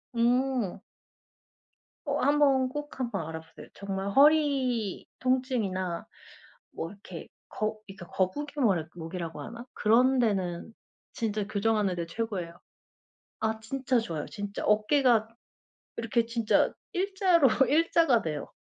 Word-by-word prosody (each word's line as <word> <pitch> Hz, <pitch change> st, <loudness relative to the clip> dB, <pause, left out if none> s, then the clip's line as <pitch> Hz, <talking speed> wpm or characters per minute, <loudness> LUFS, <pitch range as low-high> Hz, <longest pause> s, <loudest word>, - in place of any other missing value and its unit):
음. 245 Hz, -3 st, +1 dB, 1.2 s
어 285 Hz, 0 st, -1 dB
한번 275 Hz, -2 st, +3 dB
꼭 295 Hz, 0 st, -7 dB
한번 235 Hz, -11 st, -2 dB
알아보세요. 160 Hz, 0 st, -9 dB
정말 195 Hz, 0 st, -4 dB
허리 270 Hz, -, +3 dB
통증이나 225 Hz, -9 st, -1 dB, 0.7 s
뭐 165 Hz, -, -5 dB
이렇게 190 Hz, -4 st, -10 dB, 0.2 s
거 215 Hz, 0 st, -3 dB
그러니까 195 Hz, -3 st, -11 dB
거북이 290 Hz, -, -2 dB
뭐라 190 Hz, -, +2 dB
목이라고 165 Hz, 0 st, -6 dB
하나? 235 Hz, +2 st, -8 dB
그런 250 Hz, +5 st, +4 dB
데는 195 Hz, -3 st, -1 dB, 0.4 s
진짜 215 Hz, -2 st, -2 dB
교정하는데 200 Hz, -5 st, 0 dB
최고예요. 180 Hz, -4 st, -4 dB, 0.8 s
아 220 Hz, 0 st, -1 dB
진짜 255 Hz, +1 st, 0 dB
좋아요, 165 Hz, -9 st, -4 dB
진짜. 205 Hz, -2 st, -5 dB
어깨가 220 Hz, +1 st, +3 dB, 0.7 s
이렇게 230 Hz, 0 st, 0 dB
진짜 230 Hz, -2 st, +2 dB, 0.2 s
1 385 Hz, +1 st, -2 dB
자로 355 Hz, -7 st, +5 dB, 0.2 s
1 325 Hz, +4 st, +3 dB
자가 290 Hz, -9 st, +4 dB
돼요. 150 Hz, -3 st, -4 dB
225 Hz, 250 characters per minute, -28 LUFS, 195-265 Hz, 1.2 s, 자로